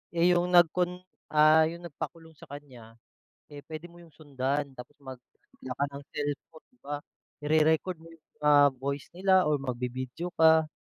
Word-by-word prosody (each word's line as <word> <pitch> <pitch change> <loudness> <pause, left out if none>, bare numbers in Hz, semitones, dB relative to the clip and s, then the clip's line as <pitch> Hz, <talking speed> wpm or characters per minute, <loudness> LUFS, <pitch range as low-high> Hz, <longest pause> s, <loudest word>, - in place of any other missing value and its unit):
Eh, 170 +1 +4
yung 175 0 +1
nagkun 180 +1 +3 0.3
ah, 155 +1 +6
yung 170 +1 -8
nagpakulong 160 +1 -8
sa - - -15
kanya, 125 -6 -12 0.5
eh, 145 -1 -10
pwede 160 +3 -8
mo 175 - -17
yung 165 -3 -18
sundan 140 -1 -3
tapos 125 +4 -11
magdala 130 0 -11
ka 140 - +1
ng 140 - -11
cellphone, 145 +2 -5
'di 250 -2 -34
ba, 145 +1 -3 0.5
ire-record 155 +4 +2
mo - - -16
yung 165 - -21
mga 150 0 +3 0.2
voice 140 +1 -4
nila 190 -4 +3
or 150 - +2
magvi-video 130 +4 -5
ka, 160 -1 +5
150 Hz, 160 wpm, -28 LUFS, 140-170 Hz, 0.5 s, ah